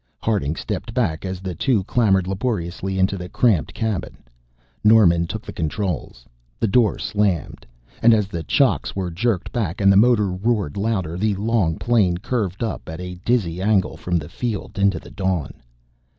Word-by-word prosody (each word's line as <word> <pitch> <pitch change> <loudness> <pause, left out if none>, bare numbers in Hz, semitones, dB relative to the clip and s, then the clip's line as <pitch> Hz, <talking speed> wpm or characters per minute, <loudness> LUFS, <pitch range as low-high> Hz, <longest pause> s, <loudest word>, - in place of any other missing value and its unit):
Harding 95 -9 0
stepped 115 - -5
back 95 -10 0
as 95 -1 -4
the 95 -2 -4
two 105 +4 +1
clambered 95 -4 +2
laboriously 95 -2 -2
into 95 +1 +1
the 90 0 -7
cramped 105 -6 +2
cabin. 110 -5 -3 0.7
Norman 95 -6 +5
took 110 +5 -5
the - - -7
controls, 80 - -3 0.3
the - - +1
door 110 +1 +3
slammed, 100 -5 -1 0.3
and 115 - +6
as 105 -3 +3
the 85 -4 -5
chocks 70 -6 +1
were 95 -3 -2
jerked 100 +2 -1
back 100 -8 -2
and 100 -1 +5
the - - +4
motor 105 -2 +4
roared 100 -4 -1
louder 100 -6 -1
the 105 +1 +1
long 100 -5 0
plane 105 -8 +2
curved 100 -1 -2
up 115 - -4
at 80 +1 -6
a 90 -1 -7
dizzy 95 -8 0
angle 100 -2 +2
from 90 -1 -1
the 75 -3 -5
field 110 -2 -4
into 100 -3 +3
the - - -11
dawn. 95 -6 -2
95 Hz, 170 wpm, -22 LUFS, 90-110 Hz, 0.7 s, and